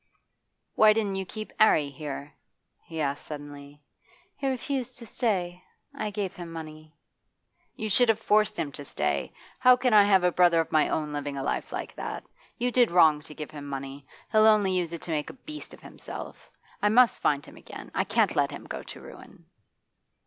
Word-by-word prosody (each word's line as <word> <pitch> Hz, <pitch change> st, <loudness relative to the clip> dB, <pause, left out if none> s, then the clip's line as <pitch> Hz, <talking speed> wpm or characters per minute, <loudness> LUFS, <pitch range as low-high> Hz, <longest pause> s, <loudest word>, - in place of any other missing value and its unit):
'Why 215 Hz, 0 st, +6 dB
didn't 205 Hz, -3 st, -1 dB
you 190 Hz, -1 st, -4 dB
keep 215 Hz, +2 st, -7 dB
'Arry 155 Hz, -9 st, +4 dB
here?' 140 Hz, 0 st, -7 dB, 0.5 s
he 165 Hz, -1 st, -7 dB
asked 140 Hz, -1 st, -2 dB
suddenly. 145 Hz, -1 st, -10 dB, 0.5 s
'He 275 Hz, -, -3 dB
refused 260 Hz, -1 st, -3 dB
to 235 Hz, -, -9 dB
stay. 185 Hz, -6 st, -1 dB, 0.3 s
I 215 Hz, -, -3 dB
gave 200 Hz, -2 st, -4 dB
him 175 Hz, -2 st, -8 dB
money.' 155 Hz, -1 st, -10 dB, 0.8 s
'You 220 Hz, -, -4 dB
should 235 Hz, +4 st, +4 dB
have 225 Hz, -, +4 dB
forced 215 Hz, -1 st, +2 dB
him 145 Hz, -, -2 dB
to 145 Hz, -, -3 dB
stay -, -, -2 dB, 0.3 s
How 255 Hz, -1 st, +7 dB
can 250 Hz, -2 st, +1 dB
I 205 Hz, -1 st, +8 dB
have 190 Hz, -3 st, +4 dB
a 180 Hz, -, +3 dB
brother 175 Hz, -1 st, +4 dB
of 165 Hz, -, -1 dB
my 155 Hz, -1 st, +3 dB
own 150 Hz, -1 st, -2 dB
living 145 Hz, -1 st, -4 dB
a 135 Hz, -, -3 dB
life -, -, -2 dB
like -, -, -5 dB
that? -, -, -5 dB, 0.3 s
You 245 Hz, +1 st, 0 dB
did 245 Hz, -2 st, +4 dB
wrong 160 Hz, -4 st, +5 dB
to 150 Hz, 0 st, -12 dB
give 150 Hz, 0 st, -7 dB
him 145 Hz, -2 st, -8 dB
money. 135 Hz, 0 st, -7 dB, 0.2 s
He'll 215 Hz, 0 st, +6 dB
only 210 Hz, -3 st, +4 dB
use 180 Hz, -3 st, 0 dB
it 170 Hz, -, -6 dB
to 170 Hz, -, -5 dB
make 150 Hz, -2 st, -2 dB
a -, -, -9 dB
beast 305 Hz, +3 st, -10 dB
of -, -, -14 dB
himself. -, -, -9 dB, 0.3 s
I 210 Hz, -, +3 dB
must 245 Hz, +2 st, +5 dB
find 145 Hz, -1 st, +1 dB
him -, -, -14 dB
again; -, -, -11 dB
I -, -, +1 dB
can't -, -, +1 dB
let -, -, +2 dB
him -, -, -9 dB
go -, -, -6 dB
to -, -, -10 dB
ruin. -, -, -14 dB
175 Hz, 200 wpm, -27 LUFS, 150-215 Hz, 0.8 s, I